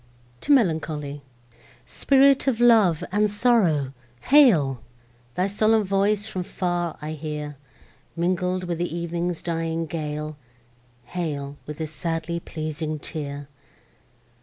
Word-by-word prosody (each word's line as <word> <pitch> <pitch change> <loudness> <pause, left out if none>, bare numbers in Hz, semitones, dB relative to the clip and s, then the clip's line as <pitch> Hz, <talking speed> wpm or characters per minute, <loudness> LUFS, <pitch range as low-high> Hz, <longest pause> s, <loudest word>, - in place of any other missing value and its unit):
TO - - -2
MELANCHOLY 155 - +1 0.6
Spirit 275 0 +3
of 245 -4 +1
love 220 -9 +5
and 210 +2 +2
sorrow—hail! 155 - +3 0.5
Thy 180 +1 +1
solemn 215 +2 +2
voice 200 +1 +1
from 190 -4 -4
far 175 -2 -2
I 155 - -4
hear, 150 -1 -5 0.6
Mingling 180 +1 0
with 170 -1 -3
ev'ning's 170 0 -3
dying 165 -1 -2
gale: 150 -1 -4 0.7
Hail, 145 -2 -4
with 150 0 -6
this 155 -2 -4
sadly 165 +2 -3
pleasing 155 -1 -4
tear! 145 -2 -6
170 Hz, 105 wpm, -24 LUFS, 150-195 Hz, 0.7 s, love